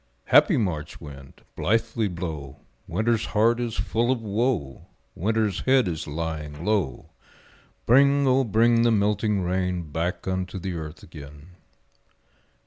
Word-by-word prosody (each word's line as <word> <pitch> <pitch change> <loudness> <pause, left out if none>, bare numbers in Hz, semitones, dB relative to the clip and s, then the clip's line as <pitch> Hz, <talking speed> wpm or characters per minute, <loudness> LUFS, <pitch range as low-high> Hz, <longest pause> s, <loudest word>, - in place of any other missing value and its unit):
Happy - - +5
March 80 -9 -3
wind, 70 -3 -12
blithely 115 +1 0
blow, 80 -7 -6 0.3
Winter's 110 0 0
heart 115 +3 +4
is 120 -2 -3
full 115 +6 0
of 130 - 0
woe, 110 - -2 0.3
Winter's 105 0 0
head 130 -4 +3
is 80 -3 -4
lying 75 0 -5
low; 100 - -1 0.7
Bring, 140 +3 +5
O 130 0 +3
bring 115 +1 +3
the 120 - +4
melting 105 -2 +1
rain 90 -3 -2
Back 85 +5 -3
unto 95 0 -2
the 95 0 -4
earth 80 -1 -7
again. 75 0 -12
95 Hz, 130 wpm, -25 LUFS, 80-115 Hz, 0.7 s, Happy